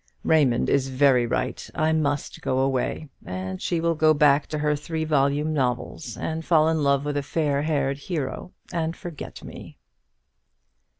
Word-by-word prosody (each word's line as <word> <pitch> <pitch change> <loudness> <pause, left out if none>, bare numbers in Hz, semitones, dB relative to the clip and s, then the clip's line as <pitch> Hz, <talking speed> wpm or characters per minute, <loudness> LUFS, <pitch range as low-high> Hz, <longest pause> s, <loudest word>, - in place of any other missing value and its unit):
Raymond 140 -7 +3
is 135 -1 +2
very 130 -2 +3
right. - - -2
I 155 +1 +2
must 145 -2 -1
go 130 - -1
away; 135 +3 -1
and 95 0 -5
she 170 - 0
will 165 0 +1
go 155 0 +4
back 145 -1 +4
to 155 - -3
her 150 0 +1
three 160 +2 -4
volume 150 0 +1
novels, 125 -2 -2
and 160 0 -3
fall 160 -2 +4
in 160 -1 +1
love 140 0 +2
with 145 0 -1
a - - +1
fair 145 -1 0
haired 140 -3 0
hero, 150 +1 -4 0.2
and 165 -1 -1
forget 170 -5 -8
me." - - -10
145 Hz, 165 wpm, -24 LUFS, 135-160 Hz, 0.2 s, go